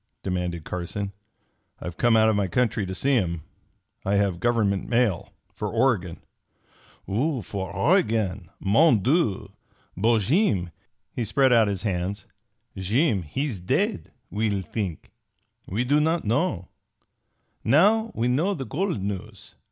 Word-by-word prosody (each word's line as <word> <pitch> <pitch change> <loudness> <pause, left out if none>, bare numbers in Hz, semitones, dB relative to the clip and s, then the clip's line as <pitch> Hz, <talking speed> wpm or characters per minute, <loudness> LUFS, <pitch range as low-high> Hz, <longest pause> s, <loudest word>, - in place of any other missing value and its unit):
demanded 90 -3 -2
Carson. 95 +4 -4 0.7
"I've 90 -1 -6
come 120 +1 +3
out 110 0 +5
of 110 - +3
my 100 -1 +1
country 105 +1 0
to 95 - -4
see 135 +8 +1
him. 85 - 0 0.6
I 100 +1 +1
have 100 -4 +1
government 105 -3 +1
mail 115 -7 +1 0.2
for - - -4
Oregon." 95 -10 0 0.8
"For 100 - -2
Oregon? 110 - +1
Mon 115 - +4
Dieu! 110 - +1 0.4
But 110 +4 +2
Jeem" 105 - +1 0.4
he 120 - -2
spread 130 +4 +3
out 115 -2 +5
his 100 -1 -3
hands 95 0 -2 0.5
"Jeem 105 - +1
he's 130 - -3
dead, 90 - -1 0.2
we'll 105 -2 0
think. 95 -6 -5 0.6
We 105 +6 -1
do 145 +4 +3
not 160 0 +1
known. 115 - 0 1.0
Now 210 - +4
we 115 +2 0
know 160 +11 +1
the 135 -5 -5
gold 170 - -2
news. 100 -1 -6
105 Hz, 130 wpm, -25 LUFS, 95-130 Hz, 1.0 s, out